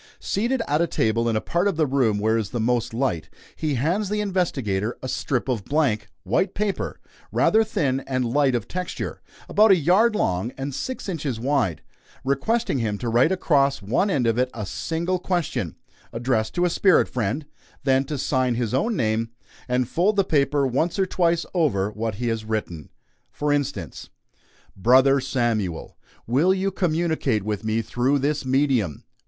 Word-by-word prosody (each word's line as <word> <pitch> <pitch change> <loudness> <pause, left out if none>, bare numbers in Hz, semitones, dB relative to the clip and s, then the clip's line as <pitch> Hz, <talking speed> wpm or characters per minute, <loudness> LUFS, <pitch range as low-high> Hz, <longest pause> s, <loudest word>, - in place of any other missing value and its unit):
Seated 235 +4 -1
at 150 +3 +1
a 170 - +2
table 115 -2 +1
in 115 - 0
a 110 - +1
part 175 +3 0
of 195 -6 -1
the 155 - +3
room 130 -6 +1
where 110 +2 +1
is 110 -3 -1
the 120 - -3
most 120 +1 0
light, 115 - -1 0.3
he 155 -3 -1
hands 175 - 0
the 210 0 -1
investigator 135 - -1
a - - -3
strip 130 0 -2
of 120 -6 -1
blank, 130 -7 0 0.2
white 125 - 0
paper, 205 -1 -2 0.3
rather 220 +1 +4
thin 140 - 0
and 130 -2 0
light 135 +2 +2
of 115 -5 -2
texture, 180 0 -5 0.3
about 215 +1 +5
a 195 - +8
yard 190 +8 +3
long 95 - 0
and 135 +1 -4
six 255 - -5
inches 150 - -3
wide, 125 - 0 0.4
requesting 140 - 0
him 105 -3 -1
to 120 +2 -3
write 120 +8 +3
across 140 - +2
one 125 - +1
end 135 -10 +1
of 115 +1 +1
it 125 0 +2
a 105 -3 -4
single 170 - -2
question, 175 -3 -2 0.4
addressed 115 -2 -1
to 175 - +2
a - - +2
spirit 185 0 +4
friend, 125 +5 -2 0.4
then 135 0 +3
to 145 +1 -4
sign 130 -2 +1
his 115 -2 -2
own 215 - +1
name, 115 - 0 0.4
and 125 -1 +1
fold 185 +10 +1
the 200 - +3
paper 145 -4 +2
once 140 +8 0
or 190 - +2
twice 170 -2 +1
over 115 - +1
what 110 -1 -3
he 120 +3 -3
has 115 -1 -1
written. 105 -9 -4 0.4
For 150 0 0
instance: 145 -2 -3 0.7
"BROTHER 130 +7 +5
SAMUEL: 115 - -2 0.3
Will 155 +11 +3
you 195 +1 -1
communicate 160 - 0
with 105 0 -3
me 110 +1 0
through 125 +6 +1
this 145 +1 -1
medium? 130 - +1
135 Hz, 175 wpm, -24 LUFS, 115-170 Hz, 0.7 s, a